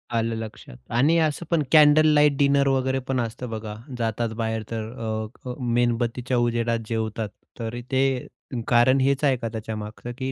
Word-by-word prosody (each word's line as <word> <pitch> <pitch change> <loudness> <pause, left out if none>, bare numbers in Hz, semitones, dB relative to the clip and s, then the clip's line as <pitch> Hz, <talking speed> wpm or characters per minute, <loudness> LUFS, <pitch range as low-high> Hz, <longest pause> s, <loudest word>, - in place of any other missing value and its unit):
आलं 115 0 0
लक्षात 110 - -8 0.2
आणि 155 +7 +4
असं 155 +1 0
पण 160 -3 +3
कॅन्डल 155 0 +7
लाईट 150 -2 +4
डिनर 140 -1 +3
वगैरे 130 0 +1
पण 130 -1 0
असतं 120 +1 -4
बघा, 110 -1 -5 0.2
जातात 115 0 -1
बाहेर 110 -1 -1
तर 110 -1 -3
अ, 110 +2 -5
अ, - - -3
मेणबत्तीच्या 120 +1 0
उजेडात 115 -1 +1
जेवतात. 110 -1 -2 0.3
तरी 115 +1 -4
ते 130 -1 +1 0.4
कारण 125 +2 +4
हेच 140 +2 +1
आहे 135 -3 +3
का 115 -1 -4
त्याच्या 110 0 -5
मागचं 105 +3 -7
की 130 0 -3
120 Hz, 170 wpm, -24 LUFS, 115-135 Hz, 0.4 s, कॅन्डल